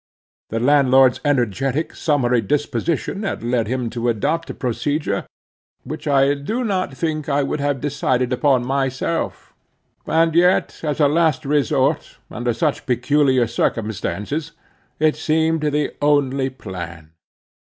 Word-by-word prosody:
The 115 - -2
landlord's 135 -1 +4
energetic, 135 - 0
summary 125 -6 +1
disposition 150 - -1
had 195 - -3
led 120 -2 0
him 125 0 -2
to 120 +1 -1
adopt 155 +9 -1
a - - -4
procedure 135 -2 -2 0.6
which - - -7
I 140 0 +4
do 215 - -3
not 185 - -2
think 155 -3 -2
I 145 0 +2
would 140 - -2
have 140 -2 -1
decided 130 -3 0
upon 130 -1 +2
myself; 135 +4 -2 0.5
and 165 0 +2
yet 180 +3 +3
as 150 -1 -2
a 145 - +5
last 155 0 +1
resort, 145 -3 +1
under 120 +1 -1
such 150 +4 -1
peculiar 130 +1 +2
circumstances, 115 - -2 0.4
it 155 0 +2
seemed 160 +1 +1
the 150 -1 0
only 140 -2 +2
plan. 85 -9 -8
140 Hz, 130 wpm, -20 LUFS, 125-150 Hz, 0.6 s, a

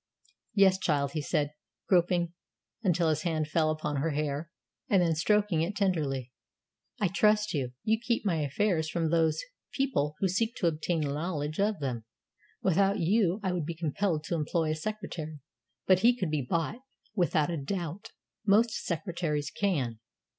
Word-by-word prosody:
"Yes, 190 -2 +5
child," 140 -5 +1
he 155 - -2
said, 145 0 0 0.4
groping 175 -2 +2 0.5
until 175 -5 +2
his 155 0 +1
hand 160 -3 -1
fell 155 0 +2
upon 155 -2 -2
her 150 +4 0
hair, 150 +1 -2 0.4
and 195 - +5
then 170 -2 +3
stroking 200 +1 +2
it 180 +5 -1
tenderly; 150 - 0 0.7
"I 205 - +3
trust 210 +3 +3
you. 130 -5 -2
You 220 +1 +2
keep 235 -1 -1
my 175 -5 +2
affairs 160 +2 0
from 165 -1 0
those 165 -2 +2 0.3
people 230 - 0
who 195 - +1
seek 225 +6 0
to - - -2
obtain 165 +1 0
knowledge 150 +1 -2
of 205 -1 +1
them. 125 -6 -3 0.6
Without 195 +2 +3
you, 190 +1 +2
I 190 - +1
would 170 -4 -2
be 170 - -3
compelled 165 0 -1
to 155 - -4
employ 160 0 0
a - - 0
secretary; 165 -4 -5 0.5
but 185 -1 +5
he 240 +4 +4
could 185 -9 -1
be 150 -2 +1
bought, 170 +9 -1 0.3
without 175 -5 +2
a 170 - -2
doubt. 175 +4 -4 0.3
Most 220 +3 +4
secretaries 165 -4 -2
can." 135 - -1
170 Hz, 160 wpm, -29 LUFS, 155-195 Hz, 0.7 s, Yes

